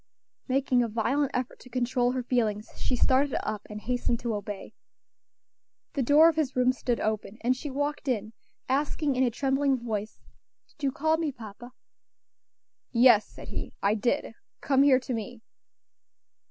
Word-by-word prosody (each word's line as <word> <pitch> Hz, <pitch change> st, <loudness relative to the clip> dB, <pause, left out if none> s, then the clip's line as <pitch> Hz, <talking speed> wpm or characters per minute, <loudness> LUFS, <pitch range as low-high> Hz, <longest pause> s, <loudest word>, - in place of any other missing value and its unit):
Making 260 Hz, -2 st, +2 dB
a 235 Hz, -, +1 dB
violent 255 Hz, +6 st, 0 dB
effort 250 Hz, 0 st, -3 dB
to 250 Hz, -, -14 dB
control 250 Hz, 0 st, 0 dB
her 255 Hz, -1 st, -2 dB
feelings, 220 Hz, -4 st, 0 dB
she 255 Hz, -, -1 dB
started 265 Hz, +2 st, +2 dB
up 210 Hz, -, -2 dB
and 210 Hz, 0 st, -6 dB
hastened 245 Hz, 0 st, -1 dB
to 235 Hz, -2 st, -2 dB
obey. 205 Hz, -1 st, -6 dB, 1.2 s
The 280 Hz, -, 0 dB
door 290 Hz, +6 st, +6 dB
of 325 Hz, -1 st, +2 dB
his 285 Hz, -4 st, 0 dB
room 255 Hz, 0 st, +3 dB
stood 245 Hz, -2 st, -2 dB
open, 215 Hz, -1 st, -2 dB
and 250 Hz, +2 st, +2 dB
she 290 Hz, +3 st, -6 dB
walked 290 Hz, +1 st, -3 dB
in, 220 Hz, -3 st, -1 dB, 0.3 s
asking 280 Hz, +1 st, 0 dB
in 255 Hz, -, +1 dB
a 255 Hz, -, +4 dB
trembling 270 Hz, +2 st, +1 dB
voice, 215 Hz, -3 st, -4 dB, 0.5 s
"Did -, -, -25 dB
you 270 Hz, -, +2 dB
call 315 Hz, +4 st, +1 dB
me, 320 Hz, -3 st, -1 dB
papa?" 240 Hz, 0 st, -11 dB, 1.2 s
"Yes," 235 Hz, -3 st, +6 dB
said -, -, -11 dB
he, -, -, -5 dB
"I 200 Hz, +1 st, +4 dB
did. 235 Hz, +5 st, -1 dB, 0.3 s
Come 270 Hz, -1 st, +2 dB
here 275 Hz, -2 st, +6 dB
to 255 Hz, 0 st, -5 dB
me." 225 Hz, +1 st, -6 dB
250 Hz, 165 wpm, -28 LUFS, 225-275 Hz, 1.2 s, door